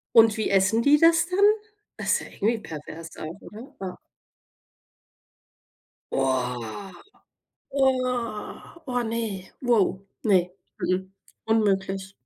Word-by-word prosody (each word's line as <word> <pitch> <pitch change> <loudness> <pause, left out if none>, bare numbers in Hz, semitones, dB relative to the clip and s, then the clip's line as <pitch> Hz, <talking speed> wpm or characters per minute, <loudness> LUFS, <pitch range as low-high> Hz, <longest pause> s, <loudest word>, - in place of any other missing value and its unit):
Und 225 -1 +7
wie 215 - 0
essen 195 +4 +4
die 290 +2 +6
das 330 +1 +5
dann? 365 +2 -2 0.6
Das - - -1
ist - - +3
ja - - -8
irgendwie 225 +2 0
pervers 160 -1 -9
auch, 160 +3 -6
oder? 225 +6 -11
Ah. 185 -2 -5 2.1
Oh, 130 - -1 0.8
oh, 255 -5 -1
oh 245 -2 0
ne, 225 -5 -3
wow, 215 -7 +2 0.2
ne. 200 -4 +6 0.4
M-m, 185 +1 -1 0.4
unmöglich. 195 -3 +1
210 Hz, 110 wpm, -25 LUFS, 185-235 Hz, 2.1 s, Und